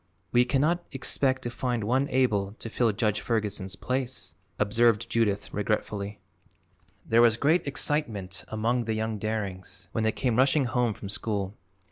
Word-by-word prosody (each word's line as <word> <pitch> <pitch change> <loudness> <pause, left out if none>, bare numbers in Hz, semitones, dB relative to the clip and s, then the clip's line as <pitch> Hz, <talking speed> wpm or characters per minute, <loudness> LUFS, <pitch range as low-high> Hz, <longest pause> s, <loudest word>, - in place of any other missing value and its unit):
"We 120 0 +5
cannot 155 +7 +1
expect 130 0 0
to 120 - -3
find 120 -2 -1
one 130 +6 +1
able 105 -7 +1
to 115 +1 -8
fill 115 -2 +2
Judge 105 0 0
Ferguson's 105 -4 -2
place," 125 -8 -2 0.2
observed 115 +2 +3
Judith 105 -3 0
regretfully. 105 0 -2 0.9
There 115 +1 +4
was 115 -1 +5
great 155 +5 +2
excitement 115 -9 -1
among 115 +3 0
the 110 0 -1
young 110 -1 -2
Darings 100 -3 -4
when 115 - -1
they 110 - +3
came 120 0 0
rushing 135 +2 +4
home 120 -3 +1
from 100 - -8
school. 100 -2 -2
115 Hz, 150 wpm, -27 LUFS, 105-125 Hz, 0.9 s, We